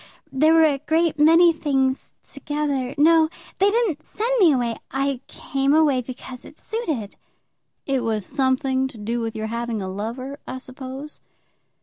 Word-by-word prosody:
There 310 +4 +4
were 325 - +6
a 285 -3 +1
great 320 +1 0
many 330 +3 +6
things 270 -4 -1
together. 280 -2 -3
No; 320 +1 +5 0.3
they 395 +1 +5
didn't 415 -9 0
send 450 +9 -3
me 355 -6 +6
away. 240 -3 -1
I 275 -1 -1
came 275 +1 0
away 295 -5 +3
because 250 0 -9
it - - -14
suited." 310 - -4 0.7
"It 270 -2 0
was 220 -3 -1
something 265 0 +1
to 255 - -12
do 230 +3 -3
with 225 -1 -4
your 220 - -3
having 235 -1 -2
a 190 - -4
lover, 235 +8 -5
I 260 - -5
suppose." 260 +3 -8
270 Hz, 155 wpm, -23 LUFS, 250-310 Hz, 0.7 s, were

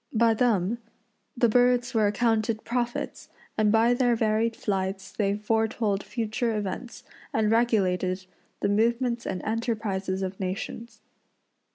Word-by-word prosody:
By 230 0 +4
them 225 -2 +1 0.6
the 240 - +4
birds 245 +1 +3
were 220 -2 +3
accounted 220 0 +1
prophets, 240 0 -3 0.3
and 215 -1 +3
by 225 +2 +4
their 245 -1 +2
varied 225 +1 +1
flights 195 -2 -2
they 200 -2 0
foretold 220 -1 0
future 225 0 -2
events 210 +4 -5 0.3
and 220 -1 +1
regulated 190 -5 +1 0.4
the - - +1
movements 235 +3 +1
and 185 - -3
enterprises 210 -4 -2
of 190 0 -4
nations. 195 +5 -5
220 Hz, 125 wpm, -27 LUFS, 200-235 Hz, 0.6 s, By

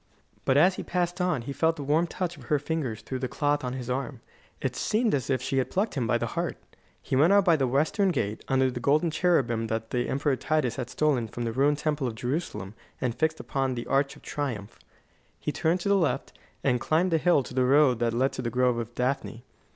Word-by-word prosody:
But 130 - +3
as 185 +5 +5
he - - -4
passed 175 0 -1
on, 175 -9 0
he 140 - -5
felt 160 +3 +2
the 145 - -6
warm 155 +5 +2
touch 175 0 -3
of 135 -6 -13
her 150 - +2
fingers 145 -6 -3
through 130 - -4
the 130 - -2
cloth 145 +2 0
on 125 -1 -3
his 130 -2 -5
arm. 130 0 -3 0.4
It - - -2
seemed 220 +1 +1
as 135 -3 -1
if 130 -2 0
she 135 0 0
had 130 - -1
plucked 205 +4 0
him 125 -5 -1
by - - +2
the - - -2
heart. - - -2 0.4
He - - -3
went 155 +8 +5
out 200 -1 +5
by 170 -3 +5
the 135 -4 +1
Western 155 - +2
Gate, 110 - -2
under 130 -1 +2
the 125 - -5
golden 150 +6 +2
cherubim 130 -10 +1
that 110 0 -3
the 125 -1 -1
Emperor 140 0 +1
Titus 145 -1 0
had 125 -2 -4
stolen 135 -5 +1
from 120 +3 -5
the 115 - -1
ruined 140 +4 +2
Temple 150 -3 -1
of 115 - -4
Jerusalem 120 - -3 0.3
and 125 -2 -1
fixed 160 +4 0
upon 135 -2 -1
the 120 - -4
arch 140 0 +1
of - - -17
triumph. 120 -9 -4 0.6
He - - -2
turned 165 +4 0
to 200 - -1
the 200 - +5
left, 145 -7 -1 0.3
and 125 -3 +2
climbed 165 +6 +2
the 165 - +3
hill 170 -4 +3
to 125 - -10
the 130 0 +2
road 135 -2 +4
that 120 -1 +1
led 130 +4 +1
to - - -4
the 120 - -2
Grove 125 0 +2
of 115 +1 -6
Daphne. 125 -2 -2
135 Hz, 240 wpm, -27 LUFS, 125-160 Hz, 0.6 s, as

